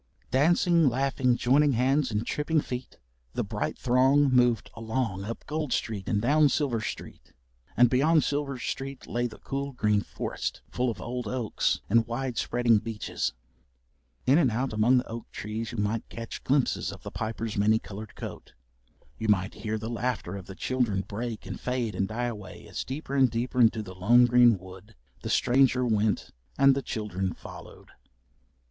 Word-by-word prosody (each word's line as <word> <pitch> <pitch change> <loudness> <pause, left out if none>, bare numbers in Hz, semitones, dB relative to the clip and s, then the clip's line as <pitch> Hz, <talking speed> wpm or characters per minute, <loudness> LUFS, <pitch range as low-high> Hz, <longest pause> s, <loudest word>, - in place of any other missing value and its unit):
Dancing, 165 +3 +4
laughing, 130 -1 +1
joining 140 +3 +3
hands 130 +3 +2
and 105 +1 -2
tripping 155 +4 0
feet, 125 -3 -5 0.4
the - - 0
bright - - -3
throng 130 +3 +4
moved 120 -4 +3
along 115 -4 -2
up 115 +2 -6
Gold 150 -2 -3
Street 105 -5 -2
and 105 - +2
down 145 +6 +4
Silver 130 -6 0
Street, - - -7 0.4
and 125 - +7
beyond 150 +6 +3
Silver 140 -2 -1
Street 135 +2 -5
lay 120 +1 -1
the 110 - -12
cool 140 0 -4
green 105 -4 +2
forest - - -5
full 125 0 0
of 115 - -5
old 125 -1 -4
oaks 120 -1 0
and 115 +2 +3
wide 120 0 -3
spreading 120 -3 +3
beeches. 110 - -3 0.9
In 140 +5 +5
and 140 -7 +4
out 120 +2 -2
among 110 +4 +4
the 125 - 0
oak 115 0 -7
trees 110 +2 -5
you 120 - -7
might 105 +2 -1
catch 115 0 -7
glimpses 135 -1 +1
of - - -11
the - - -7
Piper's 110 0 -4
many 105 +2 +4
coloured 105 0 -9
coat. - - -8 0.7
You 110 - -2
might 100 -1 +2
hear 110 0 -3
the 110 +1 -5
laughter 120 -5 -2
of 95 -1 -8
the 95 - -9
children 120 -4 0
break 110 +3 -5
and 95 0 -6
fade 125 -4 -2
and 95 +1 -1
die 120 +4 -2
away 105 -5 -7
as - - -4
deeper 140 +1 -6
and 135 -2 +4
deeper 120 +2 -1
into 110 -1 +4
the 95 -2 -9
lone 115 +7 +5
green 120 -2 +5
wood 95 +3 -13 0.3
the - - -5
stranger 125 0 +3
went 110 -2 0 0.3
and 135 0 +6
the 140 - -1
children 95 -6 -3
followed. - - -12
120 Hz, 175 wpm, -28 LUFS, 110-130 Hz, 0.9 s, and